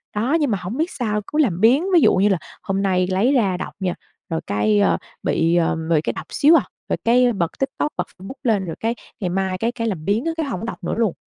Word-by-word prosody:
Đó, 255 +10 +2
nhưng 285 -6 +1
mà 200 - +1
hổng 185 +8 -5
biết 325 +4 0
sao 210 -5 -2
cứ 300 - -4
làm 190 - +2
biếng 250 +8 +5
ví 340 - +6
dụ - - +5
như 195 +3 +3
là 195 - +2 0.3
hôm 195 0 -1
nay 185 -2 +1
lấy 195 +9 +2
ra 200 -9 +2
đọc - - -6
nha, 185 -2 -1 0.4
rồi 165 -1 -2
cái, 105 0 +2
ờ, 90 -4 +3 0.3
bị, 165 +1 +2
ờ, 170 -1 +2
bị 155 -2 +3
cái - - -2
đọc - - -7
xíu 305 +3 +5
à, - - +4 0.3
rồi - - 0
cái 245 +1 +4
bật 170 -5 -1
TikTok 275 +2 -1
bật - - -1
Facebook 195 +7 -8
lên 210 -6 +1
rồi 165 - -5
cái 230 +2 -1 0.2
ngày 185 - -2
mai 190 +1 -1
cái 230 +5 0
cái 230 -2 -3
làm 170 -7 -3
biếng 210 +7 +1
á, 330 - +1
cái 320 - -1
hổng 225 -5 -4
đọc 220 - -7
nữa 175 - -2
luôn. 225 -6 +1
205 Hz, 265 wpm, -21 LUFS, 180-245 Hz, 0.4 s, ví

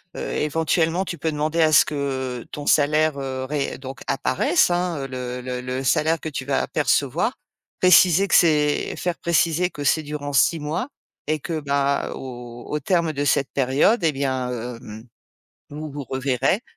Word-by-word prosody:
heu, - - -4
éventuellement, 160 +3 0
tu 175 -2 -6
peux 160 +2 -1
demander 155 +2 -1
à 155 -1 +4
ce - - +8
que 130 -4 -3
ton 145 - -6
salaire, 150 0 +3
heu, 130 -1 -4
ré 140 +1 -3
donc 135 0 -9
apparaisse, 140 +5 +2
hein, 175 -6 -1
le 125 -1 -5
le 125 0 -4
le 130 +1 -4
salaire 155 +5 +1
que 160 - -4
tu 135 -3 -5
vas 140 -1 0
percevoir. - - 0 0.4
Préciser 185 +1 +6
que - - +4
c'est 150 -3 +3
faire 175 -1 -3
préciser 170 +1 +1
que 145 -5 -7
c'est 155 +3 +2
durant 145 -1 -5
6 155 +4 +3
mois 155 - -3 0.4
et 155 0 0
que, 160 0 -3
bah, 140 -1 0
au 120 -2 -9
au 150 - -3
terme 170 +2 +1
de 145 -1 -2
cette 140 -1 +1
période 140 - +2
et 155 - +2
bien, 130 -2 -2 0.3
hem, 110 -1 -10 0.7
vous 155 +1 -6
vous 145 0 -5
reverrez, 135 - 0
145 Hz, 170 wpm, -22 LUFS, 130-160 Hz, 0.7 s, ce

